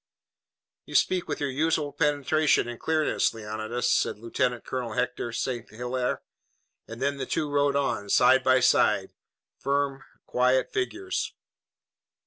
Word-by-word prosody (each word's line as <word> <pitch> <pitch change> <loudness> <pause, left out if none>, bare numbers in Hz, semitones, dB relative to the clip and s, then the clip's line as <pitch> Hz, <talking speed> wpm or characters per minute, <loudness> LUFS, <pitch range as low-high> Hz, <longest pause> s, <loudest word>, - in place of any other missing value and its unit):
"You - - -8
speak 185 -1 +2
with 145 - -3
your 145 -2 -1
usual 150 +1 0
penetration 150 -1 +2
and 120 -1 -7
clearness, 155 -6 +1
Leonidas," 110 +3 -2
said - - +1
Lieutenant 120 +2 -2
Colonel 125 -2 -4
Hector 125 -1 -2
St. 120 0 -3
Hilaire, 125 +2 -3 0.6
and 115 +1 -9
then 140 +1 0
the 130 - -4
two 150 - -1
rode 145 -1 +1
on, 110 -8 -1
side 130 +5 +5
by 130 0 +4
side, 105 -5 +3 0.5
firm, 140 0 -1 0.2
quiet 125 +1 +1
figures. 375 -1 -2
130 Hz, 130 wpm, -27 LUFS, 120-145 Hz, 0.6 s, side